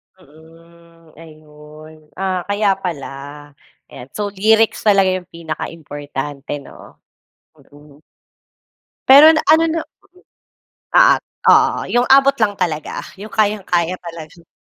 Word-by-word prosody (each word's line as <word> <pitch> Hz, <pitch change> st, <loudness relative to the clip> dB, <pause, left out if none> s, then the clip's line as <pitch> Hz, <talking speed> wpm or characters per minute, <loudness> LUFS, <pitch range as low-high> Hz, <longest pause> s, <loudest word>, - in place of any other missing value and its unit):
Mm, 165 Hz, 0 st, -21 dB
ayun, 155 Hz, 0 st, -15 dB, 0.2 s
ah, 185 Hz, -1 st, -2 dB
kaya 200 Hz, -1 st, +1 dB
pala. 170 Hz, -8 st, -5 dB, 0.9 s
Ayan 125 Hz, -, -11 dB
so, 205 Hz, -1 st, -3 dB
lyrics 220 Hz, +3 st, +2 dB
talaga 195 Hz, -3 st, +3 dB
yung 180 Hz, -, -19 dB
pinaka 165 Hz, -3 st, -6 dB
importante, 145 Hz, -2 st, -7 dB
'no, 140 Hz, -, -16 dB, 0.6 s
mm. 145 Hz, 0 st, -20 dB, 1.1 s
Pero 285 Hz, +4 st, +9 dB
ano 315 Hz, +1 st, +3 dB
na 330 Hz, -, -2 dB, 1.2 s
oo, -, -, +7 dB, 0.4 s
oo -, -, +3 dB
yung 245 Hz, +1 st, +1 dB
abot 275 Hz, +1 st, +6 dB
lang 210 Hz, -2 st, +1 dB
talaga 155 Hz, -4 st, -3 dB, 0.2 s
yung 215 Hz, -, -8 dB
kayang-kaya 195 Hz, -5 st, 0 dB
talagang 170 Hz, -1 st, -11 dB
170 Hz, 105 wpm, -17 LUFS, 155-205 Hz, 1.2 s, Pero